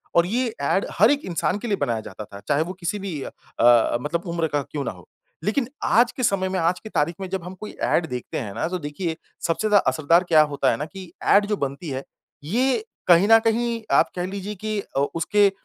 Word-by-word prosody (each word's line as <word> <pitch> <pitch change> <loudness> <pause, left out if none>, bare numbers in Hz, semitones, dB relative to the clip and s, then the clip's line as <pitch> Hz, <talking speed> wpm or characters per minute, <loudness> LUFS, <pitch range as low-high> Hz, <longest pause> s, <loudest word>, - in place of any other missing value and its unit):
और 170 - +5
ये 235 +3 0
ऐड 165 +7 +1
हर 220 +7 +7
एक 290 - +1
इंसान 180 +2 -1
के 240 - -5
लिए 205 -3 0
बनाया 115 -8 -1
जाता 110 - -8
था 100 -1 -11
चाहे 150 +1 +2
वो 180 +3 -6
किसी 200 +4 -2
भी 175 -8 -5
अ, 120 0 +2
मतलब 170 +6 -2
उम्र 170 -1 0
का 145 -1 -1
क्यों 140 +1 -5
ना - - -2
हो। 90 -4 -15 0.4
लेकिन 230 +4 0 0.2
आज 240 +2 +4
के 255 0 -5
समय 190 -3 +1
में 185 -1 -1
आज 170 +2 +1
की 220 - -10
तारीख 165 -2 0
में 190 - -3
जब 190 -2 -3
हम 180 +2 -7
कोई 215 - -7
ऐड 170 - +2
देखते 125 -3 -5
हैं 105 -7 -5
ना - - -1
तो 180 +1 -3
देखिए 160 +2 -3 0.3
सबसे 170 +6 0
ज़्यादा 210 -1 +5
असरदार 165 +3 +3
क्या 155 -2 +7
होता 140 -2 +1
है 115 - -1
ना 150 - -3
कि 185 0 -10
ऐड 205 0 +5
जो 210 - 0
बनती 140 +3 -4
है 135 0 -4 0.4
ये 255 - +1 0.2
कहीं 175 +2 +6
न 225 - +9
कहीं 230 +1 +1
आप - - +4
कह 180 0 -2
लीजिए 200 +2 -5
कि 215 +1 -3 0.2
ओ 140 - +3
उसके 200 +5 +3
अ, - - -11
180 Hz, 240 wpm, -23 LUFS, 150-210 Hz, 0.4 s, न